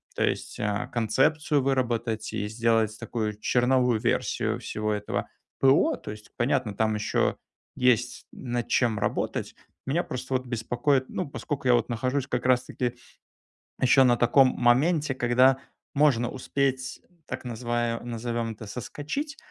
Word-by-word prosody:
То - - 0
есть, - - -2
а, 105 +4 -1
концепцию 140 +7 +1
выработать 120 -4 -1
и 105 - -2
сделать 110 -1 +1
такую 105 -3 -3
черновую 125 0 +2
версию - - 0
всего 110 0 -3
этого 105 0 -3 0.3
ПО. 135 +1 +4
То - - -10
есть 105 0 -12
понятно: 120 -3 0
там 110 -1 +1
ещё 105 - 0 0.4
есть 125 -1 +1
над 120 -2 -4
чем 115 -4 +2
работать. - - -2 0.3
Меня 160 +6 0
просто 130 +1 -5
вот 130 0 0
беспокоит, 120 +3 0
ну, 180 -6 -4
поскольку 140 -2 -4
я 125 - +6
вот 115 -2 +1
нахожусь 130 +3 -1
как 125 -2 -2
раз 125 0 +3
таки 125 -1 -3 0.9
ещё 130 +1 +6
на 120 -1 +5
таком 130 +3 +5
моменте, 140 +5 +2
когда 125 +1 +4 0.4
можно 135 -5 +3
успеть, 130 0 -2 0.2
так - - -6
называ 120 -1 -2
назовём 115 -1 -3
это- 110 0 -10
соскочить, 150 - -5
125 Hz, 140 wpm, -26 LUFS, 115-135 Hz, 0.9 s, я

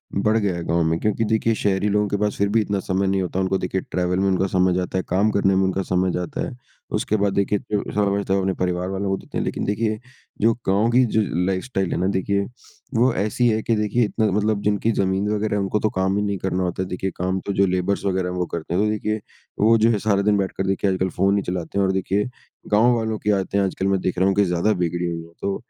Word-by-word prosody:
बढ़ 105 +3 +2
गया 95 -5 -1
गाँव 85 0 +1
में। 80 +1 0
क्योंकि 105 +1 0
देखिए 110 +1 +1
शहरी 100 0 0
लोगों 105 0 +2
के 100 - 0
पास 105 0 0
फिर 100 - +2
भी 115 - +5
इतना 100 -1 -1
समय 95 +1 -1
नहीं 95 0 +1
होता। 90 0 -2
उनको 95 0 +1
देखिए 95 0 -2
ट्रेवल 90 0 0
में 100 - +2
उनका 95 0 +1
समय 90 -1 +2
जाता 90 +1 -1
है। 95 - 0
काम 100 +4 +2
करने 95 -2 +2
में 95 - +3
उनका 95 0 0
समय 90 0 0
जाता 140 +12 -3
है। - - -7 0.4
उसके 110 - 0
बाद 100 -1 +1
देखिए 100 0 +1
जो 105 -1 +1
समय 100 -1 +1
बचत 100 - -4
है 95 - +3
वो 100 - +1
उन्हें 95 0 -1
परिवार 90 0 -1
वालों 95 +1 -2
को 95 - 0
देते - - -8
हैं, - - 0
लेकिन - - -3
देखिए 110 +1 -1 0.4
जो 115 +2 +4
गाँव 100 +4 +3
की 125 +2 +5
जो 110 -1 +1 0.2
लाइफ़स्टाइल 95 0 -1
है - - -1
ना 95 - +1
देखिए, 100 +1 0 0.5
वो 120 +2 +3
ऐसी 110 +5 +1
है 110 0 +1
कि 115 - +1
देखिए 105 +3 +1
इतना 110 +1 -1
मतलब 105 +1 +1
जिनकी 105 +2 +1
ज़मीन 95 0 0
वग़ैरह 105 0 -1
है 100 - +1
उनको 100 +2 0
तो 110 - +1
काम 95 +1 0
ही 105 - 0
नहीं 100 -1 -1
करना 95 0 -1
होता 90 0 -2
है। 95 - -6
देखिए 95 +1 -3
काम 95 +1 -1
तो 100 - -2
जो 100 0 +3
लेबर्स 95 +2 -1
वग़ैरह 95 -2 0
हैं 90 - -4
वो 90 - 0
करते 85 0 -4
हैं। 95 - +2
तो 105 - +1
देखिए 110 0 -1 0.4
वो 115 +2 +5
जो 115 +1 +4
है 105 - 0
सारा 100 -1 +1
दिन 105 0 +2
बैठकर 95 0 -2
देखिए 95 +1 +1
आजकल 95 0 0
फ़ोन 95 +4 +1
ही 100 - -1
चलाते 90 0 -4
हैं 100 - +3
और 95 - +1
देखिए 95 +3 0 0.4
गाँव 115 +4 +5
वालों 110 -1 -2
की 105 - +1
आदतें 100 0 0
हैं 100 - +2
आजकल 95 0 -2
मैं 95 -1 +2
देख 90 - -2
रहा 95 +2 +3
हूँ 95 - +2
कि 100 - +4
ज़्यादा 90 +4 +1
बिगड़ी 85 -1 -1
हुई 85 -1 -3
है। 85 - -15
तो 100 0 -1
95 Hz, 270 wpm, -22 LUFS, 95-105 Hz, 0.5 s, भी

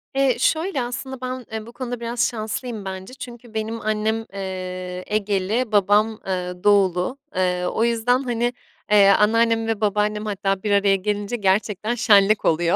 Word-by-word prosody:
Eee, 270 -2 +2
şöyle 320 0 +1
aslında 255 +2 -5
ben, 255 -1 -5
eee, 220 -1 -5
bu 235 - -11
konuda 245 -1 -5
biraz 235 0 0
şanslıyım 220 -1 -5
bence. 190 +4 -7
Çünkü 240 -3 -10
benim 220 +1 -3
annem, 215 +1 -1
eee, 185 -1 -5
Egeli, 210 +3 0
babam, 210 +2 +3
eee, 180 -1 -2
Doğulu. 200 +3 +3 0.2
Eee, 180 -1 0
o 220 - 0
yüzden, 235 +2 +2
hani, 240 0 -1 0.4
eee, 205 -2 +7
anneannem 225 +2 +3
ve 220 -1 -2
babaannem 210 +1 0
hatta 195 -2 -2
bir 210 - -1
araya 200 -1 +4
gelince 205 +3 -2
gerçekten 210 +2 0
şenlik 210 -2 +4
oluyor. 170 +1 +2
215 Hz, 155 wpm, -22 LUFS, 195-235 Hz, 0.4 s, eee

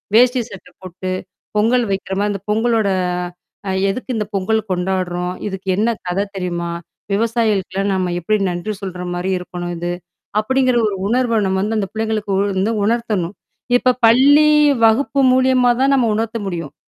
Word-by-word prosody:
வேஷ்டி, 250 +1 +5
சட்ட 195 -2 -12
போட்டு, 185 0 -6 0.5
பொங்கல் 235 +3 +3
வைக்கிறமா, 195 +1 -2
அந்த 200 - -4
பொங்கலோட 220 -1 +2 0.8
அ - - 0 0.2
எதுக்கு 255 +4 -3
இந்த 210 - -1
பொங்கல் 200 +3 +1
கொண்டாடுறோம்? 180 -1 -1
இதுக்கு 190 -1 -7
என்ன 220 +3 +2 0.2
கத 180 +2 -1 0.2
தெரியுமா? 175 -2 -3 0.4
விவசாயிகளுக்கெல்லாம் 205 -3 0
நம்ம 185 -1 -1
எப்பிடி 215 +5 0
நன்றி 175 +5 -3
சொல்றமாரி 180 -1 -4
இருக்கணும் 175 -1 -6
இது. 175 +1 -3 0.5
அப்பிடிங்கிற 255 +3 +1
ஒரு 200 - -4
உணர்வ 235 -1 +1
நம்ம 190 0 0
வந்து 215 +2 -1
அந்த 195 - -2
பிள்ளைங்களுக்கு 220 -2 -2 0.3
வந்து 205 +4 +1
உணர்த்தணும். 215 -5 -1 0.4
இப்ப 250 0 +2
பள்ளி 285 +6 +6 0.4
வகுப்பு 275 +5 +2
மூலியமா 255 -1 +4
தான் 275 +1 +4
நம்ம 245 -3 +2
உணர்த்த 225 +1 -2
முடியும். 165 -6 -5
210 Hz, 140 wpm, -18 LUFS, 185-235 Hz, 0.8 s, பள்ளி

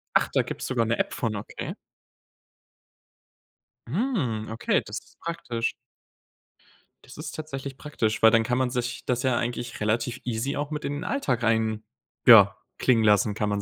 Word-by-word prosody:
Ach, - - +4
da - - +4
gibt's - - -5
sogar 120 -3 +1
'ne 115 +1 0
App - - -1
von, 115 -3 -2
okay. 100 - -6 2.1
Hm, 140 - -1
okay, 110 - +1
das - - -5
ist - - -25
praktisch. 120 -9 -2 1.3
Das - - -13
ist 150 0 -6
tatsächlich 140 -3 -6
praktisch, 115 -8 -2
weil 110 - +9
dann 115 -1 +4
kann 125 +2 0
man 130 -1 +1
sich 125 0 -3
das 125 0 0
ja 125 -2 +2
eigentlich 120 0 -3
relativ 115 +3 0
easy 125 +4 -2
auch 145 +1 -3
mit 150 0 -4
in 145 - -2
den 145 - -4
Alltag 130 - -1
rein 110 -1 +1 0.4
ja - - +8 0.2
klingen 120 -3 +3
lassen, 105 0 +4
kann 105 0 -1
man 100 0 -1
120 Hz, 170 wpm, -26 LUFS, 110-135 Hz, 2.1 s, weil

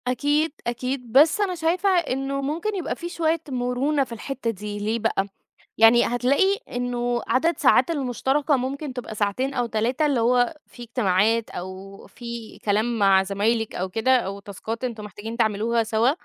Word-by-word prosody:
أكيد، 290 +6 +1 0.2
أكيد، 250 0 -3
بس 295 - +5
أنا 380 -3 0
شايفة 345 +4 +1
إنه 275 -6 0
ممكن 335 +10 -2
يبقى 365 - -3
في 345 - -6
شوية 330 -2 0
مرونة 260 +3 0
في 260 - -11
الحتّة 240 +1 -4
دي، 205 -1 -5
ليه 215 +3 -1
بقى؟ 215 -3 0 0.5
يعني 225 +2 +7
هتلاقي 275 +12 +2
إنه 245 -1 -1
عدد 330 +6 +2
ساعات - - +4
المشتركة 280 0 0
ممكن 270 +3 -4
تبقى 250 -3 -6
ساعتين 215 +7 -1
أو 245 -2 0
3 235 +7 0
اللي 275 -5 +1
هو 245 +4 +2
في 240 - -13
اجتماعات، 225 -1 +1
أو 190 +2 -8
في 235 -2 -8
كلام 220 +3 +1
مع 195 -2 +5
زمايلِك 210 +3 -1
أو 185 - -2
كده، 225 +7 +2
أو 200 -4 -3
تاسكات 220 +4 -6
أنتم 230 -4 -4
محتاجين 210 +2 -7
تعملوها 225 +1 +1
سوا، 225 +2 +2
245 Hz, 165 wpm, -24 LUFS, 220-275 Hz, 0.5 s, يعني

